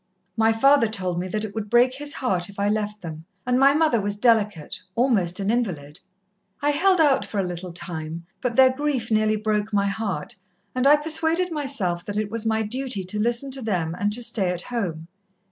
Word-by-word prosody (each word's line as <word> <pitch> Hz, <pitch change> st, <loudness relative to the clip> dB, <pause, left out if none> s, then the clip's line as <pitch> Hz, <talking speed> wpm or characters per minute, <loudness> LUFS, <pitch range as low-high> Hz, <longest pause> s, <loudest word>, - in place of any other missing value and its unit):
My 225 Hz, 0 st, +3 dB
father 270 Hz, +2 st, +4 dB
told 185 Hz, -5 st, -1 dB
me 180 Hz, -, -3 dB
that 210 Hz, +3 st, -3 dB
it 205 Hz, -, -8 dB
would 215 Hz, -2 st, -5 dB
break 245 Hz, +3 st, +4 dB
his 290 Hz, +2 st, -4 dB
heart 185 Hz, -7 st, -1 dB
if 200 Hz, -, -13 dB
I 200 Hz, +1 st, +1 dB
left 210 Hz, -1 st, -2 dB
them, 160 Hz, -1 st, -7 dB, 0.2 s
and 250 Hz, 0 st, +2 dB
my 275 Hz, +1 st, +5 dB
mother 305 Hz, -8 st, +2 dB
was 205 Hz, +1 st, -1 dB
delicate 210 Hz, -7 st, +1 dB
almost 210 Hz, -8 st, +2 dB
an 200 Hz, +2 st, 0 dB
invalid. 175 Hz, -11 st, -3 dB, 0.6 s
I 290 Hz, 0 st, +1 dB
held 370 Hz, +5 st, +3 dB
out 290 Hz, -4 st, +4 dB
for 210 Hz, -, -6 dB
a -, -, +1 dB
little 180 Hz, 0 st, -6 dB
time, 165 Hz, -1 st, -6 dB, 0.2 s
but 250 Hz, -3 st, -2 dB
their 260 Hz, -1 st, +5 dB
grief 270 Hz, -5 st, -2 dB
nearly 215 Hz, 0 st, +2 dB
broke 215 Hz, 0 st, -1 dB
my 200 Hz, -1 st, +1 dB
heart, 200 Hz, -6 st, -3 dB, 0.4 s
and 255 Hz, +1 st, +1 dB
I 290 Hz, -, +8 dB
persuaded 320 Hz, +4 st, +1 dB
myself 265 Hz, -, -1 dB
that 205 Hz, 0 st, -4 dB
it 210 Hz, -1 st, -2 dB
was 225 Hz, 0 st, -2 dB
my 220 Hz, 0 st, +1 dB
duty 245 Hz, -2 st, -3 dB
to 185 Hz, +4 st, -4 dB
listen 240 Hz, +5 st, +1 dB
to 265 Hz, 0 st, -1 dB
them, 180 Hz, -8 st, -1 dB
and 205 Hz, +4 st, -1 dB
to 240 Hz, +2 st, -1 dB
stay 195 Hz, -5 st, +1 dB
at 180 Hz, -1 st, -1 dB
home. 175 Hz, -10 st, -4 dB
215 Hz, 210 wpm, -23 LUFS, 190-255 Hz, 0.6 s, I